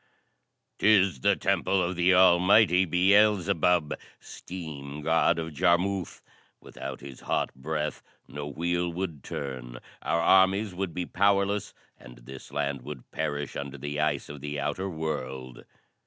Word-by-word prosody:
"'Tis 100 Hz, -8 st, +4 dB
the -, -, +3 dB
temple 95 Hz, -, +1 dB
of 90 Hz, +2 st, -2 dB
the 90 Hz, +2 st, +3 dB
almighty 90 Hz, +1 st, +5 dB
Beelzebub, 95 Hz, -2 st, +3 dB, 0.3 s
Steam 75 Hz, -5 st, -8 dB
God 80 Hz, +1 st, +3 dB
of 80 Hz, -1 st, -4 dB
Jarmuth. 90 Hz, +3 st, 0 dB, 0.4 s
Without 65 Hz, +2 st, -8 dB
his 70 Hz, -1 st, -10 dB
hot -, -, -1 dB
breath 75 Hz, +3 st, -3 dB, 0.3 s
no 70 Hz, +1 st, -6 dB
wheel 85 Hz, +4 st, -1 dB
would 85 Hz, -6 st, -5 dB
turn, 65 Hz, -3 st, -6 dB, 0.2 s
our 85 Hz, -, 0 dB
armies 95 Hz, +3 st, +4 dB
would 90 Hz, -2 st, -4 dB
be 90 Hz, -, -2 dB
powerless 100 Hz, +2 st, +1 dB, 0.2 s
and -, -, -13 dB
this 65 Hz, +2 st, -12 dB
land 70 Hz, -2 st, -2 dB
would 65 Hz, 0 st, -10 dB
perish 75 Hz, -1 st, -3 dB
under 70 Hz, 0 st, -5 dB
the 75 Hz, +2 st, -4 dB
ice 75 Hz, 0 st, 0 dB
of 75 Hz, -1 st, -9 dB
the 75 Hz, 0 st, -4 dB
outer 85 Hz, +7 st, -2 dB
world." 65 Hz, -6 st, -5 dB
80 Hz, 135 wpm, -27 LUFS, 70-95 Hz, 0.4 s, almighty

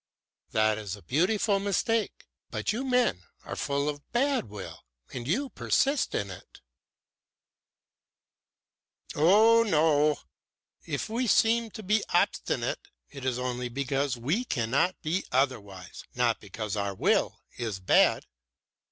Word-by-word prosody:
"That 110 Hz, 0 st, +2 dB
is 100 Hz, -3 st, -5 dB
a 100 Hz, -, -16 dB
beautiful 200 Hz, -, +1 dB
mistake. 205 Hz, +3 st, -1 dB, 0.2 s
But -, -, -2 dB
you 240 Hz, +5 st, -3 dB
men 250 Hz, -, +1 dB, 0.2 s
are -, -, -5 dB
full 140 Hz, +1 st, -1 dB
of 145 Hz, -1 st, -5 dB
bad 265 Hz, -, +1 dB
will 100 Hz, -2 st, -9 dB, 0.3 s
and 120 Hz, -1 st, -5 dB
you 260 Hz, -, 0 dB
persist 280 Hz, +2 st, 0 dB
in 100 Hz, -1 st, -2 dB
it." 90 Hz, -, -13 dB, 2.5 s
"Oh 215 Hz, +9 st, +5 dB
no! 155 Hz, -7 st, +3 dB, 0.7 s
If -, -, -2 dB
we 235 Hz, +3 st, -1 dB
seem 230 Hz, +1 st, +3 dB
to 220 Hz, 0 st, -9 dB
be 210 Hz, +3 st, +2 dB
obstinate, 400 Hz, -, 0 dB, 0.2 s
it 140 Hz, -2 st, -9 dB
is 130 Hz, -2 st, 0 dB
only 125 Hz, -1 st, -3 dB
because 135 Hz, +1 st, -1 dB
we 150 Hz, -, -1 dB
cannot 140 Hz, -, 0 dB
be 170 Hz, +4 st, -1 dB
otherwise, 105 Hz, -8 st, -2 dB
not 120 Hz, -2 st, +1 dB
because 105 Hz, +1 st, -5 dB
our 100 Hz, -1 st, -2 dB
will -, -, +1 dB, 0.2 s
is 110 Hz, -5 st, -3 dB
bad. 95 Hz, -, +3 dB
145 Hz, 125 wpm, -28 LUFS, -, 2.5 s, Oh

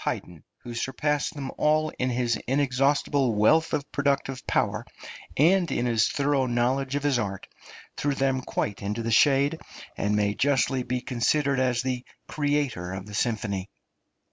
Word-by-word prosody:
Haydn, 85 Hz, -4 st, -4 dB, 0.2 s
who 120 Hz, -, -7 dB
surpassed 145 Hz, +6 st, -1 dB
them 135 Hz, -2 st, -5 dB
all 155 Hz, +1 st, +2 dB
in 130 Hz, -, +1 dB
his 120 Hz, -1 st, 0 dB
inexhaustible 135 Hz, -1 st, +1 dB
wealth 160 Hz, +10 st, +4 dB
of 140 Hz, -1 st, -2 dB
productive 140 Hz, -2 st, -1 dB
power -, -, 0 dB, 0.5 s
and 175 Hz, +4 st, +4 dB
in 120 Hz, -, 0 dB
his 115 Hz, -2 st, +2 dB
thorough 140 Hz, -2 st, +1 dB
knowledge 130 Hz, +3 st, 0 dB
of 145 Hz, -, -1 dB
his 140 Hz, -4 st, +2 dB
art, 100 Hz, -4 st, -4 dB, 0.5 s
threw 145 Hz, -1 st, 0 dB
them 135 Hz, -1 st, +1 dB
quite 105 Hz, -4 st, -3 dB
into 105 Hz, +3 st, -3 dB
the 115 Hz, -, -2 dB
shade, 140 Hz, +6 st, +4 dB, 0.4 s
and 105 Hz, +1 st, 0 dB
may 105 Hz, -1 st, +1 dB
justly 135 Hz, +1 st, +1 dB
be 125 Hz, 0 st, -2 dB
considered 135 Hz, +3 st, +1 dB
as 125 Hz, -1 st, +1 dB
the 125 Hz, -1 st, -2 dB, 0.2 s
creator 145 Hz, -, -1 dB
of 95 Hz, 0 st, -6 dB
the 105 Hz, -, -11 dB
symphony. 105 Hz, -4 st, -1 dB
130 Hz, 155 wpm, -26 LUFS, 115-145 Hz, 0.5 s, wealth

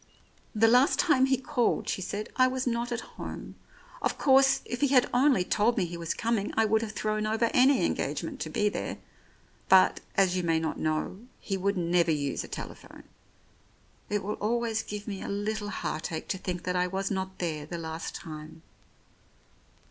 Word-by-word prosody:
"And 215 Hz, -, 0 dB
the -, -, +9 dB
last 250 Hz, +4 st, +5 dB
time 270 Hz, -6 st, +4 dB
he 265 Hz, 0 st, +2 dB
called," 255 Hz, -1 st, 0 dB
she -, -, -2 dB
said, 205 Hz, +3 st, -4 dB
"I 255 Hz, 0 st, +5 dB
was 260 Hz, 0 st, -2 dB
not 240 Hz, 0 st, -1 dB
at 235 Hz, -1 st, -2 dB, 0.2 s
home. -, -, -7 dB, 0.5 s
Of -, -, -1 dB
course, 270 Hz, -1 st, +5 dB
if 245 Hz, -, -5 dB
he 285 Hz, -, +4 dB
had 260 Hz, -2 st, +4 dB
only 255 Hz, -5 st, +4 dB
told 220 Hz, +6 st, +1 dB
me 190 Hz, -, +2 dB
he 175 Hz, 0 st, -6 dB
was 170 Hz, -1 st, -3 dB
coming, 225 Hz, -3 st, -1 dB
I 225 Hz, -, +5 dB
would 220 Hz, +1 st, +2 dB
have 220 Hz, -3 st, -4 dB
thrown 215 Hz, 0 st, -1 dB
over 225 Hz, +1 st, +1 dB
any 265 Hz, +2 st, +5 dB
engage -, -, -1 dB
ment -, -, -6 dB
to -, -, -4 dB
be 210 Hz, -, +1 dB
there, 205 Hz, -, -3 dB, 0.7 s
but, 190 Hz, -1 st, +6 dB, 0.2 s
as 190 Hz, -2 st, +4 dB
you 185 Hz, -, +1 dB
may 165 Hz, -2 st, +1 dB
not 160 Hz, -1 st, -3 dB
know, 155 Hz, +4 st, -1 dB, 0.2 s
he 195 Hz, -, -3 dB
would 195 Hz, +1 st, 0 dB
never 170 Hz, -1 st, +2 dB
use 145 Hz, -3 st, -1 dB
a -, -, -9 dB
telephone. -, -, -9 dB, 1.1 s
It 205 Hz, -1 st, -1 dB
will 210 Hz, +2 st, -4 dB
always 225 Hz, 0 st, 0 dB
give 210 Hz, 0 st, -7 dB
me 195 Hz, -2 st, -4 dB
a -, -, -5 dB
little 205 Hz, +1 st, -2 dB
heartache 160 Hz, -3 st, -4 dB
to 190 Hz, -, -2 dB
think 180 Hz, -2 st, -4 dB
that 180 Hz, 0 st, -2 dB
I 180 Hz, 0 st, +2 dB
was 195 Hz, +2 st, -2 dB
not 190 Hz, -1 st, -3 dB
there 155 Hz, -4 st, -3 dB
the 170 Hz, -, -5 dB
last 160 Hz, 0 st, -5 dB
time." 155 Hz, 0 st, -9 dB
205 Hz, 195 wpm, -28 LUFS, 175-235 Hz, 1.1 s, the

